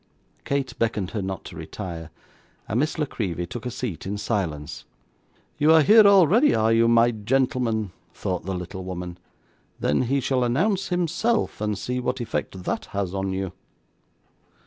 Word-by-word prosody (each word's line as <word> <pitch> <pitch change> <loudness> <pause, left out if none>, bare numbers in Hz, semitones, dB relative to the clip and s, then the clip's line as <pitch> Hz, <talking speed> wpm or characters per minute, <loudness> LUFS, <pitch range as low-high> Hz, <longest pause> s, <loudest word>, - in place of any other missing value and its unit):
Kate 140 -1 -1
beckoned 110 -5 0
her 105 - -2
not 95 -1 -5
to - - -9
retire, 80 -4 -7 0.6
and 110 - 0
Miss 155 +3 0
La 150 - +1
Creevy 90 - -3
took 120 +7 -6
a - - -1
seat 115 -7 -5
in 100 +1 -2
silence. 80 -9 -3 0.8
'You 150 +2 +5
are 160 -1 +7
here 215 +4 +8
already, 200 - +5
are 110 +1 +3
you, 115 0 +4
my 115 +1 +5
gentleman?' 115 -2 0 0.2
thought 90 -2 -3
the 95 +1 -3
little 90 +1 -6
woman. 90 -1 -6 0.6
'Then 75 - +1
he 135 +3 +1
shall 130 -1 +1
announce 185 - +1
himself, 180 - 0
and 105 -1 -1
see 125 +5 -3
what 125 +1 -2
effect 110 -5 -4
that - - -2
has 100 -2 -3
on 95 0 -2
you. 95 -1 -3
115 Hz, 165 wpm, -24 LUFS, 95-135 Hz, 0.8 s, here